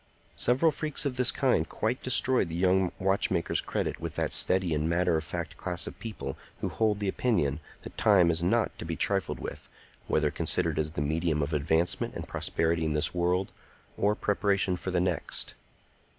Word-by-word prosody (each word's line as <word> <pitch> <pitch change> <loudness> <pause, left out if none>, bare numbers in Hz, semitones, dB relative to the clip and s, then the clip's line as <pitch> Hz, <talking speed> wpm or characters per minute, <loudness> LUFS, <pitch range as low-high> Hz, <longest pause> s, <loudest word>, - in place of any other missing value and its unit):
Several 130 +7 +3
freaks 150 -1 -2
of 135 -3 -1
this 125 -1 +3
kind 125 - +1
quite 120 +5 -2
destroyed 130 -5 +4
the 80 - -5
young 95 +1 +2
watchmaker's 95 -2 0
credit - - -3
with - - -5
that - - -1
steady 95 -3 +2
and 75 +1 0
matter 90 0 +2
of 80 - -1
fact - - -5
class 90 -2 -2
of - - -8
people 110 - -6 0.2
who - - -2
hold 110 -2 0
the 100 - -2
opinion 90 - 0 0.2
that - - -10
time 95 -5 +5
is 80 0 0
not 110 +7 +1
to - - -4
be 80 0 -3
trifled 95 +1 0
with, - - -7 0.4
whether 75 -1 +1
considered - - 0
as 80 0 -1
the 75 - -2
medium 80 +1 0
of 75 +3 -3
advancement 80 +4 0
and - - -6
prosperity 80 0 0
in 80 -1 0
this 75 +1 +2
world 90 +2 0 0.4
or 105 +1 +1
preparation 100 -3 +1
for 90 - -5
the 90 -1 +1
next. 90 -1 -2
90 Hz, 185 wpm, -28 LUFS, 80-105 Hz, 0.4 s, time